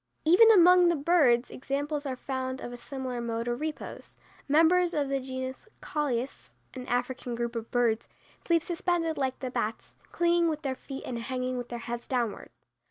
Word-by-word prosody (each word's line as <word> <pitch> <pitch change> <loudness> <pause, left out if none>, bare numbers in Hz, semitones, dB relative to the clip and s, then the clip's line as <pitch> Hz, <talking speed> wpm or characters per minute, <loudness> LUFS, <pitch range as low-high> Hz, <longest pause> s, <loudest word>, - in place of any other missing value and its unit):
Even 365 +8 +7
among 360 -3 +7
the 340 - +2
birds 280 -6 +3
examples 285 +2 -3
are 260 - -2
found 260 0 -4
of 240 - -7
a - - -5
similar 255 0 -5
mode 230 0 -3
of 240 +3 -2
repose. 310 0 -6 0.3
Members 335 +4 +4
of 285 -2 0
the 275 0 0
genus 260 - -6
Colius, 270 -4 -3 0.2
an 255 -1 -8
African 245 0 -2
group 235 0 -3
of 230 -1 -4
birds, 235 -2 +1 0.3
sleep 335 -2 +2
suspended 345 -2 0
like 260 -1 -1
the 255 -2 -3
bats, 225 -3 -3 0.2
clinging 345 0 +2
with 310 -1 -2
their 270 -2 -1
feet 270 +1 -8
and 240 -2 -4
hanging 255 +1 -3
with 245 -1 -5
their 240 - -4
heads 235 0 -6
downward. 240 -5 -2
260 Hz, 175 wpm, -28 LUFS, 245-315 Hz, 0.3 s, Even